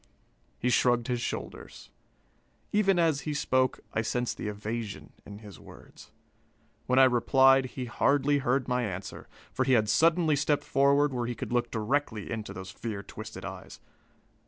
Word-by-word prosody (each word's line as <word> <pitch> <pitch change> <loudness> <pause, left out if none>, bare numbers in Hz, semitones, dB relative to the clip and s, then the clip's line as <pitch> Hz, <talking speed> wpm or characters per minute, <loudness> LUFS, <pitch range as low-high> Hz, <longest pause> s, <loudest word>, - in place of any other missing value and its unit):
He 125 - 0
shrugged 120 0 +2
his 120 -1 -1
shoulders. - - -7 0.8
Even 195 -3 +3
as 160 -4 +2
he 150 -1 -4
spoke, 130 -3 +1
I - - +1
sensed 120 +2 -2
the - - -5
evasion 105 +1 -5
in 100 - -9
his 105 -2 -12
words. - - -15 0.8
When 125 - +1
I 135 - +8
replied, 130 +2 +4
he 130 0 -6
hardly 140 +4 +2
heard 130 0 0
my 125 0 0
answer, 95 -5 -6 0.3
for 130 - 0
he 130 0 +2
had 110 -3 +3
suddenly 160 +6 +3
stepped 145 0 0
forward, 140 +1 +2
where 120 -1 -2
he 120 - -3
could 115 - -6
look 120 -1 +1
directly 110 -1 -2
into 110 -3 -5
those 95 0 -8
fear 100 -1 -6
twisted - - -9
eyes. - - -9
125 Hz, 160 wpm, -28 LUFS, 115-140 Hz, 0.8 s, I